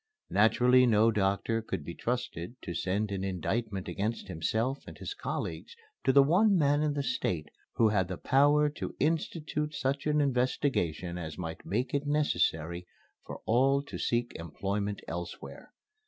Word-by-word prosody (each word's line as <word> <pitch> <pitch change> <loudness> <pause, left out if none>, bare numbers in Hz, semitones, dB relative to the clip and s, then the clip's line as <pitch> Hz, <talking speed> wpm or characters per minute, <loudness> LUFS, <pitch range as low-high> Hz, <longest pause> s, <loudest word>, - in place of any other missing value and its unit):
Naturally 125 +4 +5
no 110 0 +5
doctor 105 +2 0
could 80 -9 -5
be 85 - -5
trusted 120 -5 -3
to 85 - -4
send 100 +4 -1
an 95 -1 -2
indictment 95 +2 -2
against 105 0 -3
himself 110 - -1
and - - -9
his - - -5
colleagues 410 +3 -5 0.3
to - - +4
the 140 +1 +7
one 190 +7 +4
man 145 -2 +3
in 150 -1 +1
the 140 - -1
State 85 - -2 0.3
who 110 - +4
had 100 -4 +1
the 90 -1 -5
power 145 +2 +4
to 150 - -5
institute 150 -1 -1
such 140 +1 -1
an 150 0 +2
investigation 125 - 0
as 80 -3 -6
might 80 -3 -6
make 120 +6 -1
it 145 0 0
necessary 90 - 0 0.4
for - - -7
all 135 +4 +3
to 140 - -8
seek 120 0 0
employment 100 +5 -3
elsewhere. 85 +1 -7
115 Hz, 155 wpm, -30 LUFS, 95-140 Hz, 0.4 s, the